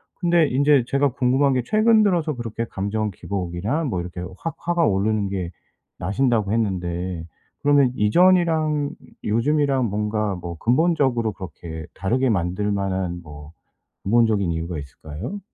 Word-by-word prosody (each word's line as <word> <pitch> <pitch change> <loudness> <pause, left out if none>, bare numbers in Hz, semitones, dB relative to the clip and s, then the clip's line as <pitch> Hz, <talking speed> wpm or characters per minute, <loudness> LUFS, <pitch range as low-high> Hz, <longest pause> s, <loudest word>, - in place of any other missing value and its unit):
근데 170 -3 +3
인제 140 0 +3
제가 140 0 +2
궁금한 135 +1 +2
게 125 - +1
최근 215 - +4
들어서 170 -6 +1
그렇게 115 -1 -4
감정 105 +2 -2
기복이나 100 - -3
뭐 95 -9 -1
이렇게 90 0 -7 0.2
확 165 - -4
화가 170 -1 +1
오르는 100 0 +1
게 90 -3 -3 0.5
나신다고 110 +1 +1
했는데 90 -5 -2 0.4
그러면 140 -3 +4
이전이랑 155 - +3 0.3
요즘이랑 135 +3 +1
뭔가 105 0 -1
뭐 85 -1 -7
근본적으로 125 - +2
그렇게 80 -3 -8
다르게 125 +8 0
만들 95 +1 0
만한 95 -3 -2
뭐 75 +1 -11 0.5
근본적인 105 -4 +2
이유가 85 +1 -3
있을까요? 75 - -7
110 Hz, 320 characters per minute, -22 LUFS, 95-145 Hz, 0.5 s, 최근